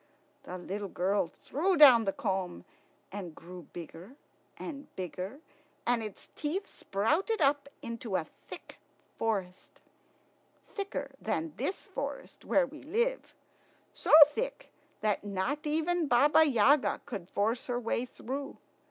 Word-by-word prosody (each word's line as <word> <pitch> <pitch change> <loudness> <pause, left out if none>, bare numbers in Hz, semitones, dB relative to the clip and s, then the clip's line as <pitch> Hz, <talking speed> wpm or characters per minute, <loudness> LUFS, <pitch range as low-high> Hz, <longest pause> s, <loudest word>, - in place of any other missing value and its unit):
The 180 - -6
little 195 +3 -4
girl 190 0 0
threw 345 - -1
down 255 -7 +9
the 195 - +2
comb, 190 - -3 0.5
and 185 -5 -6
grew 175 -1 -11
bigger 175 - -9 0.4
and 290 -2 -7
bigger, 185 - -5 0.4
and 240 -1 +2
its 215 -3 -8
teeth 335 +7 -2
sprouted 315 - 0
up 280 -1 +2
into 230 -3 -4
a 165 - 0 0.2
thick - - -10 0.4
forest, 195 -5 -3 0.9
thicker 400 -1 -4
than 320 -2 -2
this 380 - -3
forest - - -6
where 280 - +3
we 300 +3 -11
live 475 - -1 0.6
so - - -6 0.2
thick 445 +12 -5 0.3
that 210 -2 +1
not 210 +10 -2
even 320 +2 +1
Baba 295 +5 +6
Yaga 270 +3 +4
could 195 -6 -6
force 225 +4 0
her 245 -1 -1
way 235 0 -1
through. 270 +3 -6
240 Hz, 125 wpm, -31 LUFS, 195-300 Hz, 0.9 s, down